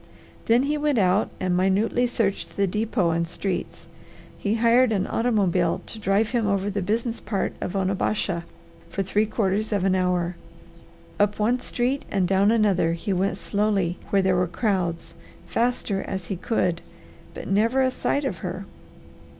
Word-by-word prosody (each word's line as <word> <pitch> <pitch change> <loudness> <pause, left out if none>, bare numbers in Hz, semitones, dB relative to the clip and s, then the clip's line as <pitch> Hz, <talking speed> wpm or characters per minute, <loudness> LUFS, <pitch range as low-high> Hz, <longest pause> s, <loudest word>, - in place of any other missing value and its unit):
Then 235 +3 +4
he 295 +2 0
went 295 -3 +1
out 190 0 +3
and 185 -1 0
minutely 200 +7 +2
searched 225 -5 -2
the 200 - +3
depot 210 -2 0
and 170 +1 0
streets. 180 +1 -4 0.5
He 205 +1 -1
hired 235 +2 +4
an 195 -4 +1
automobile 215 -7 +1
to 220 - -8
drive 210 +1 +1
him 235 -4 +1
over 200 0 0
the 200 0 -2
business 225 +5 -1
part 200 -1 -2
of 180 - -3
Onabasha 190 -2 0 0.5
for 195 - -2
three 210 +3 +1
quarters 215 0 0
of 200 -3 +1
an 190 -1 +3
hour. 180 -1 0 0.8
Up 205 0 +2
one 235 +4 +2
street 255 +2 -1
and 190 -3 +1
down 195 +2 +3
another 205 -7 +3
he 195 +4 -2
went 190 +2 0
slowly 200 -4 0
where 195 -1 +3
there 185 -1 +3
were 180 0 +2
crowds, 180 -4 -1 0.3
faster 230 -4 0
as 190 -2 -5
he 195 - -1
could, 180 -3 -1 0.5
but - - -7
never 225 +7 +2
a 260 0 +2
sight 280 +2 -1
of 265 - -3
her. - - -5
200 Hz, 165 wpm, -24 LUFS, 185-225 Hz, 0.8 s, Then